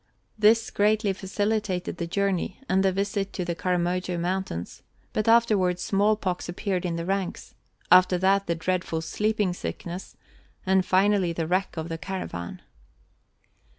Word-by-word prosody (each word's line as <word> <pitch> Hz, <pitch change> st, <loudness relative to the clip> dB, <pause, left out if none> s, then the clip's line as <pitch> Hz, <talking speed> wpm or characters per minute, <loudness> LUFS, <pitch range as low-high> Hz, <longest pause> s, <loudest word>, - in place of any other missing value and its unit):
This 220 Hz, +1 st, +4 dB
greatly 210 Hz, 0 st, +2 dB
facilitated 200 Hz, -1 st, -2 dB
the 170 Hz, -, -3 dB
journey 195 Hz, 0 st, -1 dB
and 190 Hz, -3 st, +2 dB
the 190 Hz, -, +3 dB
visit 200 Hz, +1 st, -2 dB
to 180 Hz, -, -3 dB
the 170 Hz, -, -1 dB
Karamojo 180 Hz, 0 st, -1 dB
Mountains, 175 Hz, -, -3 dB, 0.3 s
but 215 Hz, -, -1 dB
afterwards 210 Hz, -6 st, +3 dB
smallpox 200 Hz, -3 st, 0 dB
appeared 185 Hz, 0 st, -2 dB
in 170 Hz, -, -2 dB
the 170 Hz, 0 st, -3 dB
ranks, 195 Hz, -1 st, -3 dB, 0.4 s
after 180 Hz, 0 st, +6 dB
that 195 Hz, +2 st, +2 dB
the 170 Hz, -, +1 dB
dreadful 170 Hz, -1 st, -1 dB
sleeping 210 Hz, +2 st, 0 dB
sickness, 175 Hz, +1 st, -6 dB, 0.5 s
and 190 Hz, 0 st, +3 dB
finally 190 Hz, -1 st, +2 dB
the 165 Hz, -1 st, -2 dB
wreck 185 Hz, +2 st, -1 dB
of 160 Hz, 0 st, -3 dB
the 165 Hz, -1 st, -5 dB
caravan. 165 Hz, -, -5 dB
185 Hz, 140 wpm, -26 LUFS, 175-200 Hz, 0.5 s, after